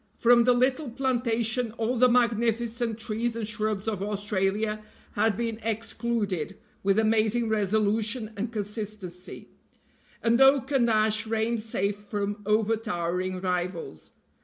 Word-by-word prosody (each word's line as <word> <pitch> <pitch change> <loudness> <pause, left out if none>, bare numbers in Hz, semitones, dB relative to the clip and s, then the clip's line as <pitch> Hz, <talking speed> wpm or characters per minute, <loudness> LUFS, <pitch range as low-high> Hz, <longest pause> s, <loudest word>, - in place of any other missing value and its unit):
From 235 0 +5
the 250 - +5
little 255 +3 +1
plantation 240 -2 0
all 230 +2 -1
the 250 +1 +5
magnificent 235 -1 +1
trees 230 +1 -2
and 225 -2 -3
shrubs 215 -2 -2
of 210 -4 -2
Australia 205 +1 -1 0.3
had 210 0 +1
been 230 -1 -2
excluded 220 -5 -2 0.2
with 195 +1 +2
amazing 220 +1 +2
resolution 215 +2 0
and 220 +3 -3
consistency, 210 -4 -6 0.7
and 235 +2 +3
oak 270 0 +5
and 250 -4 +3
ash 215 0 +2
reigned 225 +1 0
safe 205 -2 -1
from 205 0 -4
overtowering 185 -4 0
rivals. 180 - -3
220 Hz, 120 wpm, -27 LUFS, 205-235 Hz, 0.7 s, From